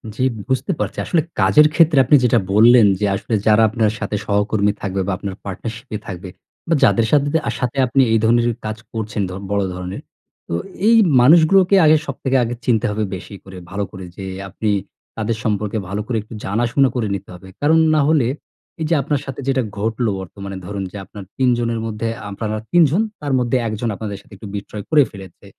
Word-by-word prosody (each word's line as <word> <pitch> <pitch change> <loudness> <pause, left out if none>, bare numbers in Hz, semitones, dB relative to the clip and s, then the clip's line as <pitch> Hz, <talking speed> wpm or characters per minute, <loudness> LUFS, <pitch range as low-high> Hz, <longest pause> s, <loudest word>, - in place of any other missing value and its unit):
জ্বি, 130 - 0 0.2
বুঝতে 130 +9 0
পারছি। - - -3
আসলে 170 - +2 0.2
কাজের 105 +11 +6
ক্ষেত্রে 160 -2 +4
আপনি 145 - +5
যেটা 120 -1 +4
বললেন 115 +1 +7
যে, 105 - +1
আসলে 105 - -5
যারা 110 +1 +5
আপনার 110 0 +1
সাথে 100 +1 -3
সহকর্মী 105 0 +1
থাকবে, 95 0 -2
বা - - 0
আপনার 100 0 -6
পার্টনারশিপ 110 +5 -7
এ - - -1
থাকবে, 95 0 -7 0.4
বা 165 - +2
যাদের 115 - +4
সাথে 145 -1 +3 0.3
সাথে 125 +1 -2
আপনি 135 +3 +3
এই 115 - +4
ধরনের 120 +1 +3 0.2
কাজ 110 0 -3 0.2
করছেন 110 -2 -3
ধ - - -7 0.2
বড় 100 -1 +1
ধরনের। 90 +1 -6 0.5
তো - - -5 0.3
এই 230 - +6 0.3
মানুষগুলোকে 175 +7 +5
আগে 155 0 +6
সবথেকে 135 -1 -1
আগে 120 +1 -2
চিনতে 115 -1 +2
হবে 110 +1 -1
বেশি 100 +2 -9
করে, 95 -1 -11
ভালো 100 +1 -2
করে 95 -2 -9
যে, 95 - -6 0.2
আপনি 105 +3 -3 0.5
তাদের 110 0 -1
সম্পর্কে 105 0 -1
ভালো 100 +2 -2
করে 120 - -1
একটু 110 - -13
জানাশোনা 120 +6 +2
করে 120 -4 0
নিতে 100 0 -8
হবে। 90 +2 -13
কারণ 155 +3 +4 0.2
না - - +3
হলে 150 -7 +3 0.5
এই - - 0
যে, 170 - +2
আপনার 145 +1 -1
সাথে 135 +1 -6
যেটা 135 -1 +2 0.2
ঘটল 115 +3 -1
বর্তমানে 95 +1 -8
ধরুন 100 +1 -4
যে, - - -8
আপনার 100 +1 -10
৩ 130 -1 +3
জনের 115 -1 -1
মধ্যে, 115 0 -3 0.2
আপনারা 110 +2 -4 0.2
৩ 175 0 +5
জন 190 - +2 0.2
তার 145 -2 -2
মধ্যে 125 +1 +1
১ 110 - -3
জন 120 - -1
আপনাদের 100 -1 -5
সাথে - - -19
একটু 105 - -9
বিট্রে 100 +1 -6
করে 150 -2 +5
ফেলেছে। 95 -1 -12
110 Hz, 200 wpm, -19 LUFS, 100-130 Hz, 0.5 s, বললেন